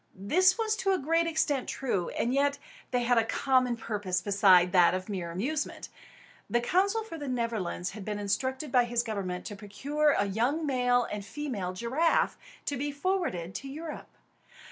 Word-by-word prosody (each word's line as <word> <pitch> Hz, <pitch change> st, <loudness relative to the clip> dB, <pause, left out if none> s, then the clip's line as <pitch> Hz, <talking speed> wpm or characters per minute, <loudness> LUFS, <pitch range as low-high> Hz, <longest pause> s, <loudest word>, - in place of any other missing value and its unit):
This 365 Hz, -, +3 dB
was 440 Hz, -1 st, +1 dB
to 390 Hz, -1 st, +1 dB
a -, -, +2 dB
great 330 Hz, +3 st, +1 dB
extent 295 Hz, -5 st, 0 dB
true; 205 Hz, -10 st, -1 dB
and 240 Hz, -, 0 dB
yet 280 Hz, +1 st, +2 dB, 0.3 s
they 250 Hz, -1 st, 0 dB
had 240 Hz, 0 st, +4 dB
a -, -, +2 dB
common 255 Hz, +1 st, +1 dB
purpose 205 Hz, -5 st, -2 dB
beside 190 Hz, -3 st, +5 dB
that 180 Hz, -2 st, +5 dB
of 185 Hz, 0 st, -4 dB
mere 185 Hz, -4 st, -3 dB
amusement. 260 Hz, -, -3 dB, 0.6 s
The 240 Hz, -, +2 dB
consul 390 Hz, -, +1 dB
for 330 Hz, -7 st, -8 dB
the 290 Hz, -, -5 dB
Netherlands 225 Hz, -8 st, -2 dB
had 210 Hz, 0 st, -8 dB
been 210 Hz, +1 st, -3 dB
instructed 260 Hz, +7 st, -2 dB
by 245 Hz, -1 st, +4 dB
his 235 Hz, 0 st, 0 dB
government 195 Hz, -5 st, -4 dB
to 205 Hz, -, -6 dB
procure 275 Hz, +10 st, 0 dB
a 200 Hz, -, +2 dB
young 240 Hz, +11 st, 0 dB
male 245 Hz, -3 st, +2 dB
and 210 Hz, -1 st, -4 dB
female 205 Hz, -6 st, -4 dB
giraffe, 260 Hz, -, +1 dB, 0.3 s
to 285 Hz, -, -2 dB
be 290 Hz, +3 st, -2 dB
forwarded 285 Hz, -, -2 dB
to 275 Hz, -, -6 dB
Europe. 305 Hz, +3 st, -7 dB
245 Hz, 175 wpm, -29 LUFS, 200-295 Hz, 0.6 s, beside